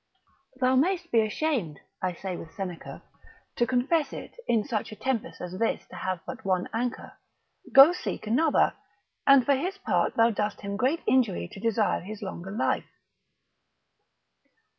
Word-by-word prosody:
Thou 255 0 +3
mayst 350 +4 +1
be 230 - +5
ashamed, 215 - -1 0.2
I 185 -1 -1
say 185 +1 -5
with 165 -2 -10
Seneca, 180 -4 -6 0.5
to 240 - +1
confess 280 +5 +1
it, - - -8
in 225 -3 +2
such 220 -5 -3
a - - -7
tempest 230 +2 -3
as 180 +1 -6
this 230 - 0
to - - -9
have 185 -1 -3
but 260 0 -7
one 185 -2 0
anchor, 245 +2 -4 0.5
go 275 +6 +9
seek 360 - -5
another: 275 +8 +3 0.5
and 275 -3 +7
for 285 - +4
his 360 +9 -2
part - - 0
thou 230 +1 +4
dost 210 -1 -2
him 200 0 -4
great 260 +10 0
injury 230 - +2
to - - -11
desire 220 0 +1
his 215 +3 -8
longer 190 -1 -6
life. 210 +5 -1
230 Hz, 160 wpm, -27 LUFS, 195-265 Hz, 0.5 s, go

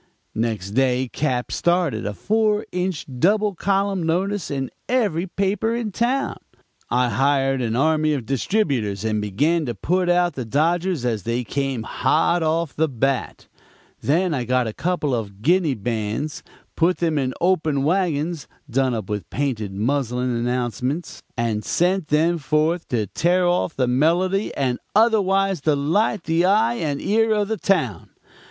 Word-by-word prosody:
"Next 110 -4 -2
day 130 +2 +1
Cap. 130 -5 -1
started 170 - 0
a 105 - -4
four 215 - +1
inch 180 -3 -2
double 205 - +3
column 195 +1 0
notice 185 +5 -1
in 135 -2 -3 0.2
every 200 -9 +1
paper 200 +5 0
in 230 -3 -3
town. 255 +7 0 0.5
I 125 0 +2
hired 135 +3 +1
an 115 -2 -1
army 155 +3 +2
of 130 -5 -4
distributers 125 - -1
and 110 -1 0
began 145 - +1
to 120 - -3
put 180 - 0
out 175 -1 +3
the 130 - -4
dodgers 165 - 0
as 115 -4 0
they 115 +4 -2
came 135 -1 -2
hot 165 +8 +1
off 160 -1 0
the 160 +1 +2
bat; 135 0 -2 0.5
then 170 +4 +1
I 130 -4 -1
got 125 +1 +1
a 110 - -4
couple 170 -4 -1
of 105 -3 -4
Guinea 170 -2 +3
bands, 110 +6 -3 0.3
put 175 +2 +2
them 160 -3 0
in 130 -2 -2
open 160 -6 +1
wagons, 165 -2 0 0.2
done 130 -1 +1
up 110 -4 -4
with 105 -5 -4
painted 120 -8 -2
muslin 125 +3 -1
announcements, 125 - -2 0.2
and 115 -3 -1
sent 180 -1 +1
them 165 +3 +2
forth 155 +5 0
to 115 -4 0
tear 175 - +1
off 175 -2 0
the 130 - +1
melody 175 - +2
and 130 -3 0 0.2
otherwise 195 -5 +3
delight 160 +8 +1
the 165 +1 +1
eye 215 +5 +3
and 150 -10 -2
ear 225 +2 +2
of 210 -1 0
the 220 - -1
town. 130 - 0
150 Hz, 155 wpm, -22 LUFS, 125-180 Hz, 0.5 s, double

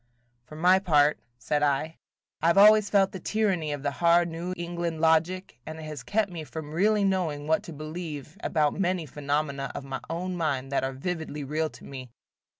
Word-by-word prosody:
"For 155 - -12
my 180 +4 +5
part," 150 -5 +3 0.2
said 145 +5 -1
I, 150 +2 0 0.4
"I 165 - +2
have 170 - +4
always 210 0 +7
felt 195 -2 +3
the 190 - -7
tyranny 185 -6 0
of 145 -1 -4
the 145 - 0
hard 170 0 +5
New 170 +2 -5
England 170 -1 -3
logic, 160 -2 +1
and 155 0 -7
it 160 - -8
has 155 -3 -6
kept 205 -2 0
me 165 -3 -6
from 155 0 -7
really 205 +4 +3
knowing 175 -7 0
what 160 +4 +2
to 170 - -8
believe 155 -1 -7
about 150 -3 +1
many 180 -3 -1
phenomena 140 -1 -2
of - - -5
my 135 -1 -4
own 180 +3 -3
mind 140 -6 -1
that 140 - +1
are 135 0 -2
vividly 155 0 -4
real 155 +3 -1
to - - -15
me." 130 -2 -8
160 Hz, 195 wpm, -27 LUFS, 145-180 Hz, 0.4 s, always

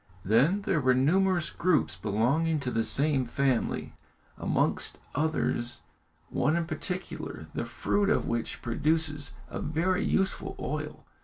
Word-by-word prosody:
Then 140 - +3
there 165 -6 +1
were 130 -1 +4
numerous 175 +6 +2
groups 170 - +1
belonging 120 - +1
to 125 -2 -2
the 115 - +1
same 140 0 +1
family, 130 0 0 0.4
amongst - - +1 0.2
others 145 -5 0 0.5
one 140 +6 +1
in 170 -1 0
particular, 180 +2 -4
the - - -2
fruit 205 -1 0
of 215 - +2
which 115 -1 -3
produces 145 +4 0 0.2
a - - -5
very 180 +5 +1
useful 195 0 0
oil. - - -4
150 Hz, 130 wpm, -29 LUFS, 125-175 Hz, 0.5 s, were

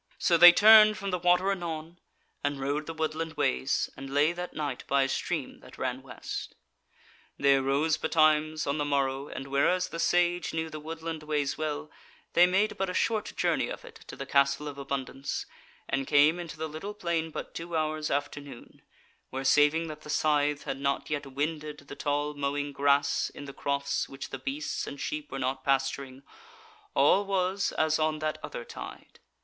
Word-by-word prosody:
So 170 - +3
they 175 +1 +11
turned 215 +2 +8
from 195 +1 -4
the 180 - -1
water 180 +2 +3
anon, 170 -2 -5 0.4
and 145 -1 -1
rode 145 +3 -2
the 165 - -4
woodland 160 +1 -2
ways, 65 - 0
and 135 0 -8
lay 145 +3 +3
that 180 +1 -6
night 145 -4 -3
by 140 0 +3
a - - +1
stream 155 +1 -3
that - - -15
ran 130 0 -2
west. 125 -3 -7 0.8
They 140 0 +4
arose 140 +4 +1
betimes 155 -1 +2
on 140 +2 -1
the - - +1
morrow, 140 -1 0
and 135 - -6
whereas 140 +7 +2
the 165 - -6
Sage 175 0 +1
knew 160 0 -2
the 155 - -6
woodland 160 +1 -6
ways 150 -2 -1
well, 155 0 -4 0.4
they 175 +1 +7
made 195 +4 +1
but 195 -1 0
a 180 - -4
short 220 -2 0
journey - - +1
of - - -7
it 460 -2 -12
to - - -8
the - - -6
Castle 140 +1 +2
of 140 -1 -7
Abundance, 135 0 -4 0.4
and 135 0 -1
came 150 +4 +5
into 170 -3 -7
the 160 +1 -3
little 160 +7 -7
plain 170 -4 -1
but - - -7
two 165 0 -4
hours 155 -1 -1
after 145 +1 -2
noon, 140 -4 -13 0.5
where 135 +1 -4
saving 150 +4 +4
that 155 0 -8
the 150 - -12
scythe 150 -1 +1
had 135 - -4
not 140 +1 -1
yet 145 -1 -2
wended 150 +2 -3
the 140 -1 -11
tall 145 +1 -1
mowing 145 0 -2
grass 140 +1 +2
in 145 - -8
the 140 - -8
crofts 140 0 -1
which 135 0 -8
the 135 - -5
beasts 140 +4 -3
and 140 - -7
sheep 150 -1 -4
were 135 - -4
not 130 0 -2
pasturing, 135 0 -1 0.7
all 145 +8 +5
was 195 0 0
as 155 0 +1
on 155 0 +1
that 155 0 -2
other - - -6
tide. - - -10
150 Hz, 190 wpm, -29 LUFS, 140-165 Hz, 0.8 s, they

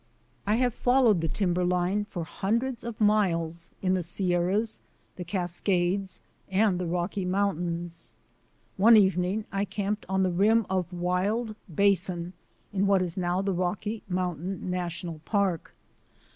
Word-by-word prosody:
I 210 - +3
have 245 0 +1
followed 245 -7 +3
the 165 - 0
timberline 180 +3 0
for 175 -4 -5
hundreds 235 +9 -2
of 235 -2 -6
miles, 170 -6 +1
in 185 0 +2
the 185 - +1
Sierras, 180 +5 0 0.3
the 180 - -5
Cascades, 180 +1 -1 0.3
and 190 -1 +2
the 180 - -2
Rocky 175 +3 -2
Mountains. 175 - -2 0.6
One 225 +3 +7
evening 190 +1 +2
I 195 0 0
camped 205 +1 -3
on 190 0 +2
the 185 - +1
rim 215 +5 +3
of 185 -2 -1
Wild 190 +6 -1 0.2
Basin 180 -1 +1 0.4
in 200 0 +1
what 195 -2 +4
is 175 -2 -3
now 180 +1 0
the 195 -1 0
Rocky 185 +5 -2
Mountain 180 0 -2
National 175 -2 -4
Park. 195 -3 -1
185 Hz, 135 wpm, -27 LUFS, 175-205 Hz, 0.6 s, One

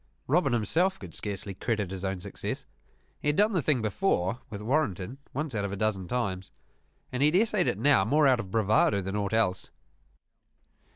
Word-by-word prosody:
Robin 150 0 +2
himself 160 - +1
could 90 -4 -10
scarcely 100 -1 -5
credit 105 -1 -2
his 95 -1 -5
own 95 -1 -2
success. - - -5 0.6
He - - -3
had 150 - +3
done 210 +4 +4
the 180 -5 +1
thing 135 -5 +1
before, 110 - 0
with 105 -2 -6
Warrenton, 120 - -1
once 150 0 -3
out 105 -2 -1
of 100 - -2
a - - -3
dozen 100 -3 -1
times: 95 -6 -2 0.6
and 125 - -2
he 145 - +6
had 155 - +1
essayed 210 -2 +3
it - - 0
now 140 -8 +4
more 145 +8 +3
out 130 -2 +4
of 100 -5 -5
bravado 105 -1 +2
than 95 +2 -4
aught 100 -1 -1
else. 95 -5 +1
110 Hz, 190 wpm, -28 LUFS, 95-145 Hz, 0.6 s, he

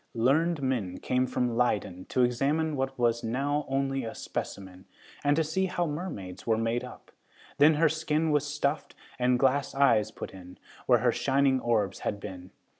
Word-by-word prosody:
Learned 145 +6 +2
men 115 -9 -1
came 130 0 0
from 125 -1 -1
Leyden 105 -6 0
to 125 - +1
examine 145 +6 +1
what 135 0 -2
was 120 -1 +1
now 140 +6 -1
only 135 0 -1
a 115 - -6
specimen, 95 -1 -6 0.4
and 145 0 +3
to 160 - +2
see 190 +5 0
how 175 -1 -1
mermaids 145 - -6
were 110 -1 +3
made 115 +2 -1
up. - - -11 0.5
Then 150 +2 +6
her 160 +2 +4
skin 160 0 0
was 150 -1 +2
stuffed, 150 0 -2 0.2
and 125 0 +3
glass 135 +2 +1
eyes 110 -6 +4
put - - -8
in, 90 -1 -12 0.3
where 120 -3 +5
her 120 0 +3
shining 135 +1 +2
orbs 110 -6 0
had 100 - -3
been. 90 -2 -8
130 Hz, 175 wpm, -28 LUFS, 115-145 Hz, 0.5 s, Then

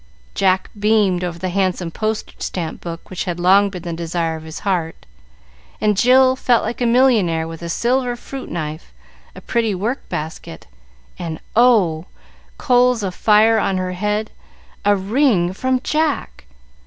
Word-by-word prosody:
Jack 190 -1 +1
beamed 205 -4 +2
over 175 -1 -4
the 185 +2 -3
handsome 185 -2 -1
postage 215 +3 -4
stamp 165 -4 -4
book 170 +1 -8
which 185 - -4
had 175 -2 -3
long 195 +3 +4
been 180 -3 -8
the 170 - -4
desire 165 0 -2
of 160 - -8
his 160 0 -8
heart, 175 -5 -2 0.7
and 210 -1 +2
Jill 255 +4 +5
felt 245 -2 +2
like 235 +3 -4
a 240 - +2
millionaire, 220 -10 +3
with 165 0 -9
a 170 - -5
silver 245 +6 0
fruit 265 +2 -8
knife, 155 -1 -6 0.4
a - - -10
pretty 225 -4 0
work 230 +9 -3
basket, 160 +2 -6 0.5
and 160 -2 -5 0.2
oh! 200 -9 +3 0.5
coals 250 -2 +3
of 190 -2 -2
fire 220 +3 +4
on 190 -2 0
her 185 0 -2
head! 210 +3 -2 0.5
a 205 0 +4
ring 200 -3 +1
from 260 +5 0
Jack. 305 - -2
195 Hz, 155 wpm, -19 LUFS, 175-235 Hz, 0.7 s, Jill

